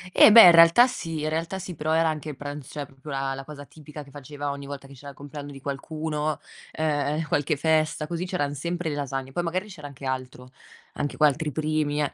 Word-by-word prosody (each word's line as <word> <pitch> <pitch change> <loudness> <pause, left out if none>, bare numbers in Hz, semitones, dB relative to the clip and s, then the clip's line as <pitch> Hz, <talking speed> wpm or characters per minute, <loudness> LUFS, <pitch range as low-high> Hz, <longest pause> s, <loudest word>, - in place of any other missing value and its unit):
Eh - - +9
beh 230 +1 +11
in 175 - +10
realtà 170 +8 +8
sì 165 -11 -4
in 155 - 0
realtà 165 +4 -2
sì, 185 -1 -6
però 155 +1 -3
era 165 0 +3
anche 155 -1 -3
il 145 - -6
pranz 145 -1 -7
cioè 145 -2 -5
proprio 135 +2 -14
la 135 -1 -2
la 135 0 -7
cosa 145 0 -10
tipica 150 0 -11
che 140 - -17
faceva 145 +1 -6
ogni 140 0 -7
volta 140 -1 -8
che 135 - -13
c'era 140 +2 -11
il 135 - -12
compleanno 145 0 -9
di 135 - -10
qualcuno, 150 +2 -3 0.3
ehm, 150 0 -1
qualche 145 +1 0
festa 155 0 +1
così, 170 +3 -4
c'erano 145 -6 -1
sempre 170 +3 -3
le 145 - -3
lasagne, 135 -2 -4
poi 175 - -2
magari 185 +4 -3
c'era 150 -7 -9
anche 140 -1 -11
altro, 130 -1 -5 0.4
anche 145 - -4
qu 155 - +1
altri 150 +1 +2
primi 155 0 -1
eh, 145 - -3
150 Hz, 230 wpm, -25 LUFS, 140-160 Hz, 0.4 s, beh